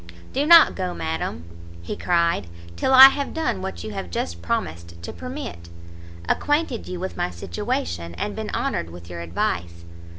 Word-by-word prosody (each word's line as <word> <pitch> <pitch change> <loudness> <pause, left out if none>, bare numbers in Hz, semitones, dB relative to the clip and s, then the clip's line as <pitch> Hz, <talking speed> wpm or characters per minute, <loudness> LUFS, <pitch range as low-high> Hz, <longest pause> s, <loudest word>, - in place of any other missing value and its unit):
"Do 280 +3 0
not 335 0 +8
go, 185 -1 -3
madam," 80 0 -3 0.4
he - - -4
cried, 170 - +1 0.3
"till 260 - 0
I 265 +1 +11
have 280 0 -4
done 320 - -1
what 85 -3 -5
you 110 - -6
have 90 -3 -5
just 85 0 -4
promised 85 0 -3
to - - -6
permit, 255 - -7 0.6
acquainted 290 - 0
you 180 -1 -5
with 190 +1 -5
my - - 0
situation, 85 -1 -4
and - - -3
been - - -5
honoured 80 - -2
with 85 +1 -11
your 85 - -6
advice. 85 0 -3
90 Hz, 165 wpm, -23 LUFS, -, 0.6 s, I